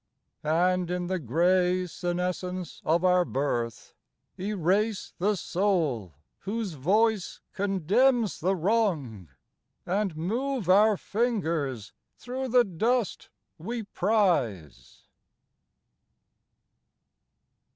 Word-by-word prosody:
And 175 +3 +1
in 180 0 -2
the 185 +1 -2
gray 180 +6 +2
senescence 180 +1 -4
of 170 +3 +2
our 180 0 +4
birth 120 -8 -3 0.5
Erase 200 +2 0
the 205 +4 +2
soul 165 - -1 0.2
whose 205 -2 -3
voice 205 - +1
condemns 205 - +2
the 190 +4 +1
wrong, 160 - 0 0.6
And 190 -3 -1
move 235 +6 -2
our 205 +3 +5
fingers 165 - -2 0.2
through 260 +2 -4
the 250 0 +5
dust 225 +4 -1 0.3
we 230 +7 -4
prize. 175 - -1
185 Hz, 85 wpm, -27 LUFS, 165-210 Hz, 0.6 s, our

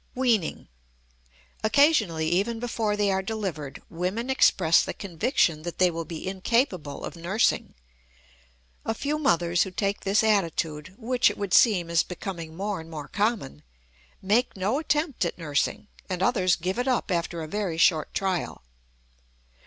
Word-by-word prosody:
WEANING. 235 -9 0 1.0
Occasionally, 220 - +3
even 205 +7 0
before 225 -3 -1
they 205 -1 +2
are 190 0 +1
delivered, 190 -9 -5
women 185 +9 -3
express 170 -10 +4
the - - -5
conviction 170 - 0
that 175 +1 -6
they 180 -1 +4
will 165 0 -4
be 165 +2 -7
incapable 190 - -1
of - - -7
nursing. 180 +7 0 1.1
A 225 - -2
few 295 +5 -2
mothers 175 - +2
who 190 - +1
take 200 +2 -1
this 200 +3 +2
attitude, 170 -5 0
which 245 0 +2
it 205 - -6
would 200 -3 -3
seem 180 -8 +4
is 170 0 +4
becoming 170 -3 -6
more 200 0 -3
and 160 - -12
more 150 -3 -7
common, 210 - -1 0.6
make 215 +4 +1
no 205 +9 0
attempt 300 -2 0
at - - -2
nursing, 150 +4 -1 0.2
and 185 0 -2
others 185 -6 +3
give 185 +6 -3
it 250 - -1
up 250 -5 0
after 170 -1 -2
a - - -6
very 195 -2 -2
short 160 -2 +3
trial. 190 -3 -2
190 Hz, 155 wpm, -26 LUFS, 170-225 Hz, 1.1 s, express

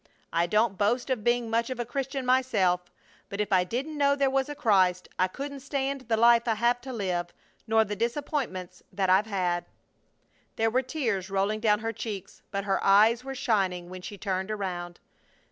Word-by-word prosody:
I 170 +1 +2
don't 210 +1 +1
boast 240 +6 +1
of 240 -5 -1
being 240 0 +2
much 230 +1 0
of 255 -2 -5
a 240 - -1
Christian 270 +2 -3
myself, 210 -9 +2 0.4
but 200 - -6
if 210 -1 0
I 185 -1 +5
didn't 270 +10 -4
know 280 0 +4
there 275 -1 +1
was 270 +1 0
a 295 - -5
Christ 185 -7 +2
I 185 - +4
couldn't 280 +8 -6
stand 275 0 -2
the 225 -2 +1
life 235 +1 +5
I 225 - +2
have 240 +2 +1
to 265 - -7
live, 185 -7 -2 0.4
nor 220 0 +4
the 210 0 -4
disappointments 235 - -3
that 190 -2 +1
I've 195 +4 +4
had." 180 -4 -1 0.9
There 225 0 +1
were 255 +3 +2
tears 230 - -2
rolling 195 +2 0
down 215 -1 +2
her 225 0 -2
cheeks, 205 -3 -6
but 200 0 -3
her 195 -1 0
eyes 220 +5 +5
were 270 0 -6
shining 185 -7 0
when 185 0 -7
she 200 +3 -8
turned 190 0 -2
around. 180 -4 -4
220 Hz, 195 wpm, -27 LUFS, 190-255 Hz, 0.9 s, I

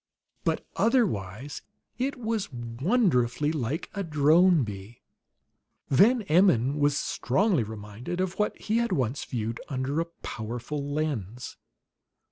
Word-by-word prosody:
But - - 0
otherwise 145 - 0 0.4
it 270 +3 0
was 220 -6 -2
wonderfully 125 - +1
like 150 0 -3
a 200 - -3
drone 160 +1 +4
bee. 105 +1 -8 0.9
Van 220 - +5
Emmon 150 - +3
was 145 0 +3
strongly 185 - +1
reminded 110 - -6
of 185 +1 -2
what 210 - 0
he 220 +2 0
had 235 0 +1
once 130 0 0
viewed 115 -2 -3
under 135 +3 -1
a - - -1
powerful 120 -3 -5
lens. 125 -7 -3
145 Hz, 115 wpm, -27 LUFS, 120-185 Hz, 0.9 s, Van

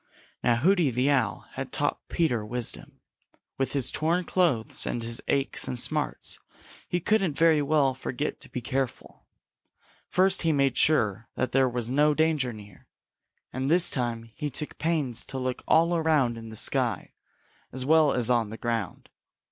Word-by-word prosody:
Now 120 - +3
Hooty 170 +4 +3
the 125 +3 +1
Owl 120 -7 0
had - - -6
taught - - -2
Peter 125 -10 0
wisdom. 120 +2 -3 0.6
With 135 -1 -1
his 135 -4 0
torn 170 +3 0
clothes 165 -11 0
and 120 - -3
his 115 0 -1
aches 140 0 +2
and 125 - -3
smarts 150 +3 -1 0.5
he 175 - -1
couldn't 190 -4 +1
very 160 -2 +4
well 145 -2 +2
forget 130 +2 -4
to - - -9
be 125 - -5
careful. 130 +1 -4 0.8
First 190 +1 +3
he 165 - +2
made 140 -4 +2
sure 115 -8 +2
that 130 - -1
there 135 -1 +3
was 120 -1 -3
no 150 +2 +3
danger 155 -5 +1
near, 105 -4 -13 0.7
and 130 +2 -2
this 175 +2 +3
time 120 -3 -2
he 145 +7 -6
took 150 +3 -5
pains 150 -7 -1
to 135 - -7
look 130 -1 -3
all 170 +2 +4
around 155 -7 +2
in 115 -1 -9
the 110 - -9
sky - - -1 0.6
as 130 0 -3
well 155 0 +5
as 125 -2 +2
on 115 -3 +1
the 110 - -8
ground. 115 -6 -3
135 Hz, 165 wpm, -27 LUFS, 120-155 Hz, 0.8 s, well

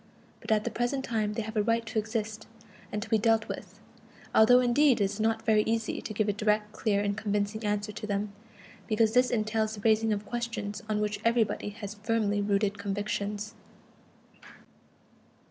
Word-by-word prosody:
But - - -6
at 215 -1 +3
the - - -2
present 265 +3 -1
time 215 -3 -1
they 225 - -2
have 220 +1 -7
a 210 - +3
right 230 +2 +1
to 220 -1 -1
exist, 220 0 -4 0.4
and 210 0 -2
to 220 - -11
be 220 - +4
dealt 225 0 +2
with, - - -7 0.5
although 245 +3 +7
indeed 255 +1 +4
it - - +3
is 200 +2 -2
not 225 +1 0
very 215 -1 +4
easy 225 0 -1
to - - -6
give 215 0 0
a 205 - +2
direct, 210 0 0
clear 205 -2 0
and 205 0 0
convincing 210 0 -1
answer 210 0 -1
to 215 0 -7
them, 200 0 -2 0.5
because 220 0 +2
this 250 +1 +4
entails 220 -1 0
the 205 - -9
raising 220 +1 +3
of 210 0 -1
questions 230 -3 -4
on 210 -1 0
which 210 -1 -1
everybody 230 -3 +1
has 205 -1 -7
firmly 210 -2 +1
rooted 200 0 0
convictions. 205 +1 -3
215 Hz, 180 wpm, -29 LUFS, 205-225 Hz, 0.5 s, although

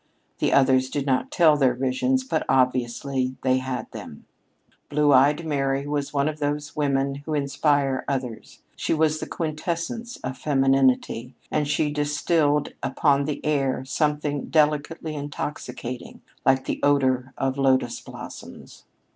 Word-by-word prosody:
The - - +1
others 130 -1 +4
did 140 0 -2
not 130 -2 +1
tell 160 -3 +5
their 130 -4 +3
visions, 135 - 0
but 160 -12 -1
obviously 130 +1 +1
they 130 0 +3
had 130 -1 -4
them. 75 - -10 0.6
Blue 145 0 +3
eyed 145 +5 +4
Mary 135 -2 0
was 145 -1 -2
one 140 0 +1
of 155 0 -3
those 145 0 -2
women 140 -1 0
who 155 - -2
inspire 140 -1 +1
others. 130 -5 -5
She - - 0
was 155 0 +2
the - - -5
quintessence 170 +9 -3
of 130 0 -5
femininity, 135 -3 +2 0.2
and 150 -1 0
she 150 0 +1
distilled 150 0 +1
upon 140 +1 +2
the 150 -1 -4
air 135 -3 0
something 150 0 -1
delicately 155 +1 +1
intoxicating, 140 -4 -6 0.3
like 130 0 +4
the - - -2
odor 130 -2 +2
of 135 0 -1
lotus 130 -1 +2
blossoms. - - -11
140 Hz, 140 wpm, -24 LUFS, 130-150 Hz, 0.6 s, tell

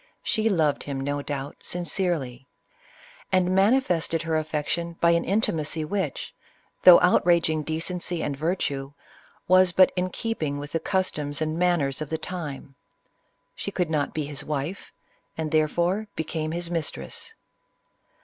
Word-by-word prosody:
She 220 0 +1
loved 160 -7 +2
him, 140 -2 -4
no 145 +1 -2
doubt, 140 0 -5
sincerely; 165 -7 -2 0.8
and 185 -1 +3
manifested 190 -6 +2
her 165 -1 -1
affection 155 +2 -2
by 170 - +4
an 170 0 +2
intimacy, 165 -6 0
which, 195 +4 -3 0.5
though 180 -2 +10
outraging 170 -3 +3
decency 165 +2 -3
and 140 - -2
virtue, 140 -3 -2 0.5
was 185 0 +6
but 185 +2 +6
in 185 0 0
keeping 160 -9 -3
with 145 +1 -7
the 165 - 0
customs 150 -6 -1
and 155 0 -1
manners 165 -6 +1
of 155 - -4
the 160 - -1
time.. 155 -5 -6 0.8
She - - -4
could 180 -5 -1
not 145 -2 0
be 155 -2 -3
his 145 0 -6
wife, 150 +5 -4 0.5
and 160 -2 -3
therefore 170 +7 +1
became 155 0 -3
his 170 +1 -2
mistress. 170 - -3
160 Hz, 140 wpm, -25 LUFS, 150-180 Hz, 0.8 s, though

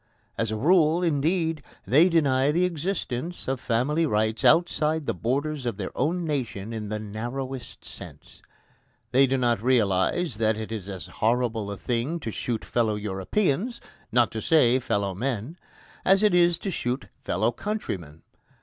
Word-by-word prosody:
As 115 - -1
a 110 - -2
rule, 165 - +3
indeed, 160 +1 +1 0.2
they 155 +8 +5
deny 140 -4 +3
the 175 +4 +2
existence 170 -3 -3
of 135 -1 -1
family 140 +8 +1
rights 110 -1 0
outside 160 -2 +3
the - - 0
borders 140 +4 -2
of 115 -5 -2
their 95 -3 -5
own 170 +6 0
nation 115 -8 -3
in 105 -2 -5
the 110 - -2
narrowest 120 +5 -6
sense. - - -12 0.7
They 135 +2 +5
do 135 +1 +1
not 120 -4 +1
realise 115 - +1
that 110 -1 +1
it 110 0 -6
is 105 -3 -5
as 95 -5 -6
horrible 115 +2 0
a 100 - -5
thing 125 - -2
to 115 - -4
shoot 115 +1 -3
fellow 115 -3 +1
Europeans 135 - -1 0.3
not 120 0 +3
to 110 - -4
say, 130 -5 +4
fellow 100 -5 -1
men 125 - -3 0.4
as 195 +2 +4
it 210 - +4
is 175 -1 +4
to 195 - -4
shoot 125 -4 -2 0.2
fellow 110 +6 +1
countrymen. 95 - -5
125 Hz, 160 wpm, -26 LUFS, 110-160 Hz, 0.7 s, they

